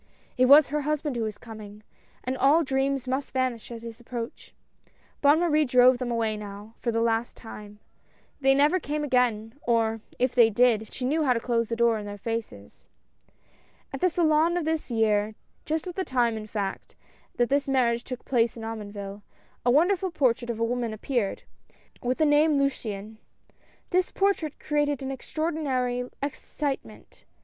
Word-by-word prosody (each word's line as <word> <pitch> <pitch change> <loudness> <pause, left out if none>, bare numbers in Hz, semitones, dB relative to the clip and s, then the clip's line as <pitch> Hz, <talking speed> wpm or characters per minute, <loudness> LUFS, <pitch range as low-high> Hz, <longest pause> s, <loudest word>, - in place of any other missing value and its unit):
It 255 - +4
was 285 +3 +8
her 300 +1 -1
husband 295 -1 -1
who 235 - -2
was 215 -2 -3
coming 215 -2 -11 0.2
— - - -34
and 255 +1 -2
all 285 +6 +4
dreams 270 -1 0
must 265 +2 -2
vanish 255 -3 -2
at 230 -1 -8
his 230 0 -8
approach. 240 0 -7 0.7
Bonne 290 +2 +5
Marie 310 -3 +3
drove 250 -1 +5
them 250 -1 -3
away 225 -2 0
now 205 +1 -9
for 235 - -1
the 230 0 +1
last 230 0 0
time. 210 -2 -10 0.6
They 270 -1 +4
never 295 +6 +4
came 300 -1 -3
again, 240 -5 +1
or, 225 -2 +1 0.2
if 250 0 +1
they 235 -3 +6
did, 225 -1 +2
she 255 - -4
knew 310 +5 +1
how 260 -4 +3
to 235 - -1
close 230 -1 0
the 230 - -1
door 235 -1 +3
in 205 - -7
their 205 0 -6
faces. 215 - -6 1.1
At 270 - -5
the 365 - +4
Salon 330 0 +2
of 345 - -1
this 320 -2 -1
year, 215 -2 +1 0.3
just 315 +2 -1
at 360 - -5
the 380 - -2
time 245 -6 +1
in 215 -1 -6
fact, 200 -3 -4 0.4
that 240 -1 +1
this 280 +1 +1
marriage 240 -3 +2
took 255 -1 -7
place 235 -2 +1
at 225 - -7
Omonville, 205 -2 -6 0.4
a 245 - +2
wonder 335 +10 +5
ful 375 +1 -3
portrait 255 -7 +1
of 230 -1 -3
a - - +1
woman 235 -1 -2
appeared, 220 -2 -2 0.6
with 250 +1 -1
thq 310 -1 +3
name 295 +1 +4
Luciane. 220 -6 -2 0.7
This 365 0 +2
portrait 390 -7 0
created 290 -2 0
an 265 - -3
extraordinary 265 -4 -2
ex 280 - -3
citement. 285 -3 -5
250 Hz, 180 wpm, -26 LUFS, 225-290 Hz, 1.1 s, was